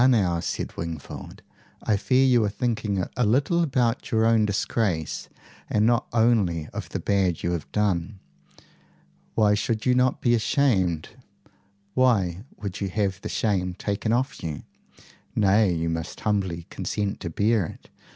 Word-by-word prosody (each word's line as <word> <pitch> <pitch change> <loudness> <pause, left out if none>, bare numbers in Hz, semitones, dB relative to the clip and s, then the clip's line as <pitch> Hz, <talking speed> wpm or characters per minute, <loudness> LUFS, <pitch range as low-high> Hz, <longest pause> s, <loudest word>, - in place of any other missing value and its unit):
now," 95 -9 +3
said - - -4
Wingfold, 80 -2 -7 0.4
"I 110 - +2
fear 130 +6 +3
you 125 -3 +4
are 105 - +1
thinking 105 -4 -1
a 125 - +1
little 140 +10 +2
about 125 -6 0
your 110 -3 +2
own 115 -1 +4
disgrace 100 -5 -1 0.4
and 105 0 +2
not 120 0 +2
only 110 -9 +2
of - - -5
the - - -3
bad 95 -4 +1
you 85 - 0
have 85 -3 -4
done. 100 -2 0 1.2
Why 105 -1 +4
should 110 +1 -1
you 125 - +4
not 125 0 +2
be 120 - +2
ashamed? 105 - +1 0.8
Why 105 -7 +2
would 100 -2 -6
you 100 - -1
have 95 -1 -1
the - - -5
shame 90 -5 0
taken 105 +3 -2
off 130 +4 0
you? 80 -3 -4 0.7
Nay; 100 -1 +4
you 85 -1 -1
must 80 0 -4
humbly 95 -6 -1
consent 100 -1 -2
to - - -4
bear 105 +5 +2
it. - - -13
105 Hz, 150 wpm, -25 LUFS, 90-115 Hz, 1.2 s, you